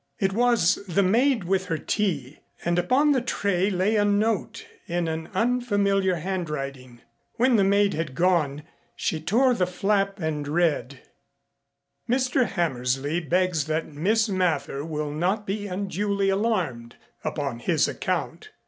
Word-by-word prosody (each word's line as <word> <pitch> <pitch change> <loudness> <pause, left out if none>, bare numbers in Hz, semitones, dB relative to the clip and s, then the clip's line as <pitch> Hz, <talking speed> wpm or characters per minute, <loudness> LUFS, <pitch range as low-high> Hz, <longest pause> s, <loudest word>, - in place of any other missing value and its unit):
It 195 0 0
was 235 -5 +3
the 190 +3 +2
maid 235 +4 +2
with 190 +1 0
her 165 -3 -2
tea, 155 - -2 0.3
and 175 +1 +2
upon 265 +12 +3
the 265 -3 +2
tray 200 -5 0
lay 195 +3 +1
a 205 - +3
note 205 0 0 0.2
in 170 0 -1
an 160 0 -4
unfamiliar 205 -5 +1
handwriting. 140 -9 -5 0.3
When 255 +1 +3
the 205 - +4
maid 200 +1 +3
had 155 -4 -4
gone 155 -4 +1 0.3
she 155 - -2
tore 245 +11 +3
the 185 -6 0
flap 195 +2 0
and 155 -3 -2
read: 145 -5 0 1.1
Mr. 255 0 +2
Hammersley 140 -2 -1
begs 175 -2 0
that 155 0 -3
Miss 215 +9 +1
Mather 165 -8 -1
will 150 -2 -3
not 185 +8 -1
be 205 +1 -3
unduly 200 +1 -1
alarmed 185 - -1 0.3
upon 140 -6 -3
his - - +1
account. - - -3
185 Hz, 140 wpm, -25 LUFS, 155-205 Hz, 1.1 s, the